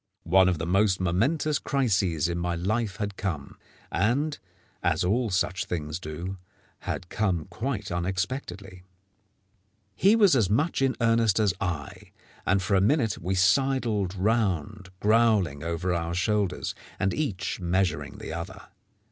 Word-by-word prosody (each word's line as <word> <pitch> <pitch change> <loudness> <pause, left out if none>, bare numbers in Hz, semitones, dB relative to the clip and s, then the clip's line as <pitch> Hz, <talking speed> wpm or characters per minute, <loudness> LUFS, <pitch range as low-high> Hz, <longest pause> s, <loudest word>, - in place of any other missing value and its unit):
One 95 +2 +5
of 90 - 0
the 80 - -3
most 95 +2 +2
momentous 135 - +1
crises 95 - +1
in 85 0 -2
my 85 0 -1
life 100 +4 -1
had 105 -2 -4
come, 80 -8 -4 0.4
and, 130 - 0 0.4
as - - +1
all 115 +6 +1
such 90 0 0
things 80 -1 -4
do, 85 +4 -6 0.4
had 90 - -4
come 95 -7 0
quite 110 +1 -3
unexpectedly. 90 +1 -3 1.1
He 195 - +4
was 205 -9 +5
as 110 -7 +2
much 145 +9 +1
in 135 -1 +2
earnest 115 -3 +3
as 105 -4 +3
I, 80 -6 -4 0.3
and 95 0 +2
for 100 - -1
a 95 - +4
minute 115 -1 +2
we 90 +3 -2
sidled 105 0 +2
round 100 -2 0
growling 105 -9 +3
over 85 +2 -1
our 85 0 -2
shoulders, 100 +1 0 0.3
and 95 - +1
each 105 -14 -2
measuring 90 -5 -1
the - - -7
other. 95 +4 -7
95 Hz, 140 wpm, -27 LUFS, 90-110 Hz, 1.1 s, One